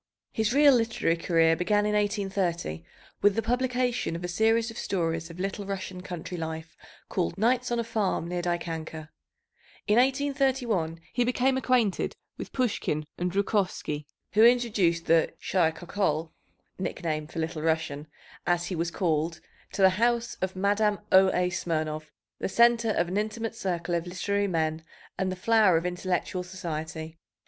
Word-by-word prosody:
His 220 0 0
real 285 +1 +6
literary 225 -8 +1
career 165 -1 +3
began 205 +4 +1
in 210 - 0
1830 195 - -1 0.4
with 205 -1 +4
the 225 - 0
publication 245 -4 0
of 170 - -6
a - - -2
series 225 +5 +2
of 225 - -11
stories 165 -3 -1
of 170 +1 -11
Little 195 +2 -3
Russian 190 -2 -5
country 180 -1 -6
life 160 0 -5 0.3
called 85 - -2
Nights 245 +4 +2
on 240 - +1
a - - +1
Farm 210 -7 -1
near 175 0 -2
Dikanka. 165 -3 -4 0.8
In 210 +1 +3
1831 260 - +1
he 245 - +2
became 255 +2 +2
acquainted 250 -6 +1 0.2
with - - -7
Pushkin 215 - -1 0.2
and 180 0 0
Zhukovsky, 185 -6 -1 0.3
who 215 - +5
introduced 215 -9 +3
the 165 0 +3
"shy 175 -4 +2
Khokhol" 160 -2 -2 0.5
(nickname 155 -5 -3
for 165 - -11
"Little 160 -1 -2
Russian"), 160 -2 -1 0.4
as 175 0 +2
he 185 - -3
was 165 +1 -1
called, 165 -2 -1 0.3
to 195 - +1
the 190 +1 +5
house 235 -1 +1
of 185 0 -2
Madame 205 +2 +2
O. 190 0 +7
A. 180 0 +1
Smirnov, 155 -3 -2 0.3
the - - -2
centre 235 +1 +4
of 175 -5 +1
"an 185 +3 -2
intimate 220 +2 -2
circle 180 -6 -3
of 170 0 -1
literary 200 +3 -1
men 160 -3 -1 0.4
and 190 0 0
the - - -3
flower 210 -2 +4
of 165 - -2
intellectual 180 0 -2
society." 160 -3 -6
185 Hz, 155 wpm, -27 LUFS, 165-220 Hz, 0.8 s, O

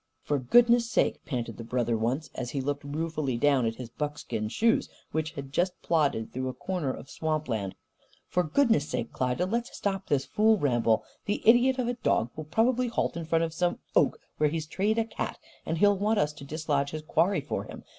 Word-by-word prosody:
"For 145 -1 0
goodness' 235 - +5
sake!" - - +1
panted 120 -5 -3
the 115 - -6
brother, 120 0 0
once, 125 +7 -1
as 125 -2 -4
he 140 - -3
looked 145 +2 -2
ruefully 150 -3 -2
down 135 -2 +3
at 115 - -2
his 120 -2 -8
buckskin 145 -7 -3
shoes 225 - +2 0.2
which 155 0 -2
had 140 -3 -7
just 180 +4 0
plodded 145 -9 +1
through 130 +1 -2
a 130 - -6
corner 165 -1 -2
of 135 - -8
swamp 155 0 -2
land. 105 -6 -2 0.5
"For 180 - +1
goodness' 180 - +2
sake, 115 - -3
Klyda, 130 +7 0
let's 235 +5 -2
stop 195 -1 -2
this 135 -2 +1
fool 220 +1 +3
ramble! 120 - +2 0.2
The 205 - -2
idiot 245 +3 +6
of 250 -2 0
a 245 - 0
dog 120 - 0
will 155 - -6
probably 240 +9 +2
halt 235 - -1
in 170 -1 -4
front 165 +1 +2
of 165 -1 -2
some 175 +1 0 0.2
oak - - +3 0.2
where 150 -1 +4
he's 160 0 -3
treed 200 +8 0
a 225 - +2
cat, - - -4 0.3
and 165 - -1
he'll 205 +2 +4
want 210 +2 +2
us 150 -3 +1
to 145 - -11
dislodge 145 -2 -1
his 155 0 -6
quarry 180 +5 +2
for - - -4
him. - - -10
155 Hz, 210 wpm, -28 LUFS, 130-200 Hz, 0.5 s, idiot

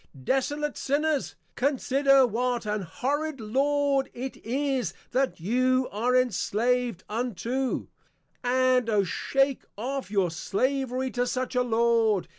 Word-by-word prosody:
Desolate 290 - -1
Sinners, 295 +1 0 0.2
consider 275 0 +3
what 245 +1 -1
an 210 0 -1
horrid 285 - -2
Lord 275 +4 +1
it 260 +2 -5
is 265 - -1 0.2
that 265 -4 0
you 255 +7 +2
are 240 +5 +1
Enslav'd 245 -2 +1
unto; 240 +3 -2 0.6
and 255 -1 +2
Oh 210 -2 +3
shake 270 +8 0
off 260 +1 -3
your 195 -4 +1
Slavery 260 - -1
to 245 0 0
such 255 +1 -2
a 250 - +3
Lord. 230 -4 +2
255 Hz, 115 wpm, -27 LUFS, 230-270 Hz, 0.6 s, consider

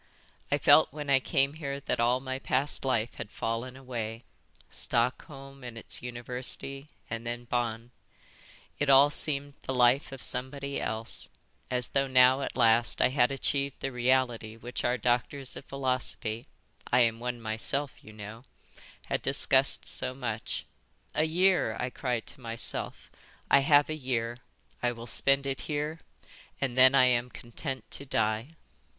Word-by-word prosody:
I - - +4
felt - - +6
when 145 -1 -4
I 135 - +6
came 135 +2 +1
here 140 -3 -4
that - - -2
all 120 +2 +3
my 130 0 -4
past 135 +2 +1
life 120 -4 0
had - - -6
fallen 115 +4 -3
away, 115 -3 -5 0.5
Stockholm 135 +3 -1
and 120 -2 -8
its 115 - -4
University, 125 +3 -5 0.2
and 115 +1 -5
then 120 +1 -4
Bonn: 120 -1 -2 0.9
it 145 - +1
all 140 +2 +7
seemed 145 -1 -2
the 130 - -3
life 125 +3 +4
of 135 -3 -8
somebody 140 +3 -4
else, 110 +1 -3 0.4
as 125 -1 -1
though 135 0 +1
now 130 +1 +5
at 135 - -4
last 115 -1 +4
I - - +5
had 130 -1 +3
achieved 140 0 -1
the 135 - -3
reality 125 -3 +1
which 120 +2 -5
our 125 +1 +1
doctors 125 +3 0
of - - -9
philosophy—I 125 -2 -2
am 115 -1 +2
one 120 0 -3
myself, 115 +5 -2
you 110 - -12
know—had 110 +3 -9
discussed - - +2
so 130 - -1
much. 115 -4 -4 0.5
'A 155 - +2
year,' 175 - +2
I 125 0 -2
cried 125 -4 -2
to 140 - -13
myself. 115 -1 -4 0.4
'I 140 - +8
have 145 +1 +5
a 155 - -3
year. 120 -5 -2 0.4
I 120 0 +1
will 115 0 -9
spend 135 +3 +2
it 135 -1 -2
here 150 +2 -2 0.6
and 130 -3 -1
then 130 +1 +7
I 130 -2 +7
am 125 -1 +2
content 125 +2 -5
to 140 - -5
die.'" 110 +7 0
125 Hz, 155 wpm, -29 LUFS, 120-135 Hz, 0.9 s, I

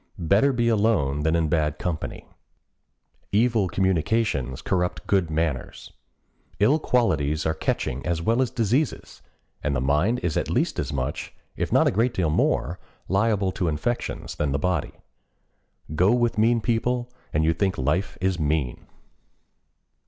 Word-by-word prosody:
Better 100 - +3
be 120 -2 0
alone 105 -11 +2
than 80 +2 +1
in 80 -1 +1
bad 75 -1 0
company. 85 -2 -4 1.0
"Evil 110 -1 +2
communications 95 - 0
corrupt 90 -2 -1
good 95 -5 +1
manners." 80 -4 -3 0.7
Ill 135 +10 +4
qualities 75 - +1
are 80 - +1
catching 70 -4 -2
as 85 -2 -1
well 115 +9 +1
as 130 - +1
diseases, 125 +4 -1 0.4
and 70 -1 0
the - - +1
mind 75 - +2
is 85 -3 0
at - - -1
least - - 0
as - - -2
much, 70 +1 -4 0.2
if - - -3
not - - +4
a - - +3
great 115 +4 +1
deal 85 -4 +1
more, 85 +2 0 0.3
liable 100 0 +1
to 90 -2 -2
infections 80 +11 -2
than 75 -2 -1
the - - +1
body. 90 0 -1 1.0
Go 90 +6 +3
with 120 -1 +1
mean 115 +2 +3
people 120 +2 0 0.2
and 75 - +1
you 80 - +3
think 95 +3 -1
life 75 +9 -1
is 95 -1 0
mean. 75 -4 -1
90 Hz, 150 wpm, -24 LUFS, 75-115 Hz, 1.0 s, Ill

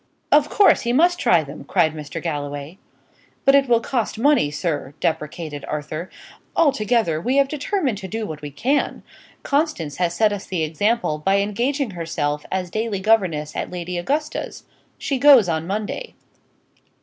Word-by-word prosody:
"Of 295 0 +5
course, 410 - +5
he 240 0 -1
must 350 +6 +3
try 180 - +4
them," 140 +1 -9
cried 165 -5 +2
Mr. 150 -2 -6
Galloway. 145 +1 -5 0.7
"But 275 - +6
it 275 -2 +4
will 235 -1 +5
cost 235 -2 -2
money, 280 - +3
sir," 150 -2 -3
deprecated 150 -2 -3
Arthur. 155 +3 -5 0.5
"Altogether, 225 - +2
we 255 +8 0
have 280 -1 +4
determined 290 - -1
to 190 - -7
do 220 +3 -4
what 155 -5 -7
we 145 - -6
can. 255 - -1 0.4
Constance 280 - -1
has 175 -1 0
set 210 +3 +3
us 200 - -6
the 180 -4 -1
example, 165 +1 0
by 195 +6 +2
engaging 235 +6 -1
herself 150 -4 -3
as 185 -2 -2
daily 220 -2 -2
governess 185 -8 +1
at - - -3
Lady 180 0 -5
Augusta's. 295 - -3 0.3
She 275 -2 -2
goes 265 -7 +7
on 160 -1 -2
Monday." 215 - -4
195 Hz, 160 wpm, -22 LUFS, 155-260 Hz, 0.7 s, goes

